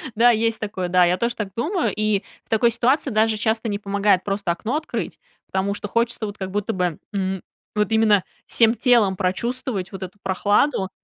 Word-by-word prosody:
Да, 240 Hz, +2 st, +6 dB
есть 225 Hz, 0 st, 0 dB
такое, 190 Hz, -4 st, -3 dB
да, 180 Hz, 0 st, +5 dB
я 175 Hz, +1 st, +2 dB
тоже 235 Hz, +3 st, -1 dB
так 210 Hz, -3 st, -3 dB
думаю. 340 Hz, -, 0 dB
И 215 Hz, -1 st, +1 dB, 0.2 s
в -, -, -31 dB
такой 225 Hz, +2 st, +3 dB
ситуации 255 Hz, +4 st, +1 dB
даже 220 Hz, 0 st, +2 dB
часто 220 Hz, +1 st, 0 dB
не 205 Hz, -1 st, -2 dB
помогает 200 Hz, -2 st, +1 dB
просто 195 Hz, -3 st, -1 dB
окно 215 Hz, +10 st, -3 dB
открыть, 310 Hz, +1 st, -4 dB, 0.3 s
потому 190 Hz, +1 st, -1 dB
что 205 Hz, -, -5 dB
хочется 230 Hz, +1 st, 0 dB
вот 205 Hz, 0 st, -7 dB
как 190 Hz, -1 st, -5 dB
будто, 190 Hz, -5 st, -1 dB
м, 190 Hz, -2 st, -2 dB, 0.3 s
вот 210 Hz, -1 st, +1 dB
именно 215 Hz, -3 st, +4 dB, 0.2 s
всем 230 Hz, 0 st, +3 dB
телом 235 Hz, -7 st, +3 dB
прочувствовать 200 Hz, +2 st, -2 dB
вот 190 Hz, 0 st, -6 dB
эту 185 Hz, +2 st, -8 dB
прохладу. 195 Hz, +3 st, +1 dB
210 Hz, 185 wpm, -22 LUFS, 190-230 Hz, 0.3 s, Да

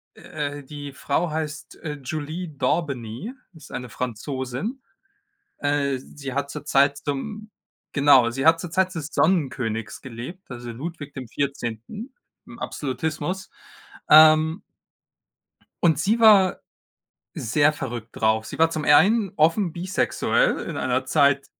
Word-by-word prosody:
äh, 145 Hz, -1 st, -5 dB
die 145 Hz, +1 st, -8 dB
Frau 145 Hz, +5 st, -1 dB
heißt, 155 Hz, -1 st, -5 dB
äh, 155 Hz, -3 st, -3 dB
Jolie 155 Hz, +6 st, -4 dB
Dorbeny, 140 Hz, -, -2 dB, 0.2 s
ist 155 Hz, -3 st, -14 dB
eine 125 Hz, -1 st, -5 dB
Französin. 130 Hz, -, -4 dB, 0.8 s
Äh, 140 Hz, -2 st, 0 dB
sie 135 Hz, +1 st, -8 dB
hat 140 Hz, 0 st, -2 dB
zur -, -, -7 dB
Zeit 140 Hz, +1 st, +3 dB
zum 210 Hz, +10 st, -5 dB, 0.4 s
genau, 140 Hz, -4 st, +5 dB
sie 135 Hz, +4 st, -2 dB
hat 165 Hz, 0 st, +6 dB
zur 175 Hz, -, -6 dB
Zeit 185 Hz, +2 st, +1 dB
des 155 Hz, -3 st, -4 dB
Sonnenkönigs 130 Hz, -, 0 dB
gelebt, 130 Hz, +10 st, -9 dB
also 120 Hz, -1 st, -7 dB
Ludwig 145 Hz, +4 st, -7 dB
XIV 135 Hz, -, -4 dB, 0.3 s
im -, -, -12 dB
Absolutismus, 155 Hz, +6 st, -3 dB, 0.6 s
ähm 155 Hz, +3 st, +7 dB, 1.2 s
Und 160 Hz, -4 st, +4 dB
sie 215 Hz, +8 st, +1 dB
war 205 Hz, -5 st, +6 dB, 0.7 s
sehr 145 Hz, +6 st, +2 dB
verrückt 120 Hz, -5 st, -5 dB
drauf. 110 Hz, 0 st, +1 dB
Sie -, -, -8 dB
war 165 Hz, 0 st, +4 dB
zum 155 Hz, -2 st, -3 dB
einen 195 Hz, +7 st, +5 dB
offen 165 Hz, +3 st, +3 dB
bisexuell 180 Hz, +3 st, +1 dB
in -, -, -5 dB
einer 130 Hz, 0 st, 0 dB
Zeit, 140 Hz, 0 st, +3 dB
145 Hz, 125 wpm, -24 LUFS, 130-165 Hz, 1.2 s, ähm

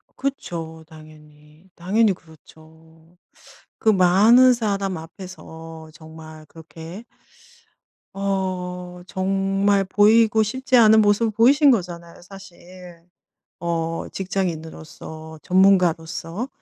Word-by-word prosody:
그쵸 165 Hz, -12 st, -6 dB
당연히. 155 Hz, +1 st, -18 dB
당연히 200 Hz, +4 st, +1 dB
그렇죠. 160 Hz, +1 st, -20 dB, 0.6 s
그 220 Hz, -, +1 dB
많은 215 Hz, +7 st, +5 dB
사람 200 Hz, -5 st, -2 dB
앞에서 160 Hz, -2 st, -11 dB
정말 155 Hz, -1 st, -13 dB
그렇게 165 Hz, +6 st, -12 dB, 1.1 s
어 180 Hz, -2 st, -4 dB
정말 195 Hz, +1 st, 0 dB
보이고 220 Hz, +2 st, +3 dB
싶지 260 Hz, +3 st, 0 dB
않은 220 Hz, -1 st, +6 dB
모습을 210 Hz, +2 st, +2 dB
보이신 275 Hz, +6 st, +4 dB
거잖아요 170 Hz, -6 st, -4 dB
사실. 180 Hz, -2 st, -14 dB, 0.6 s
어 165 Hz, -1 st, -3 dB
직장인으로서 160 Hz, -4 st, -6 dB
전문가로서. 180 Hz, +2 st, +1 dB
180 Hz, 210 characters per minute, -21 LUFS, 160-200 Hz, 1.1 s, 않은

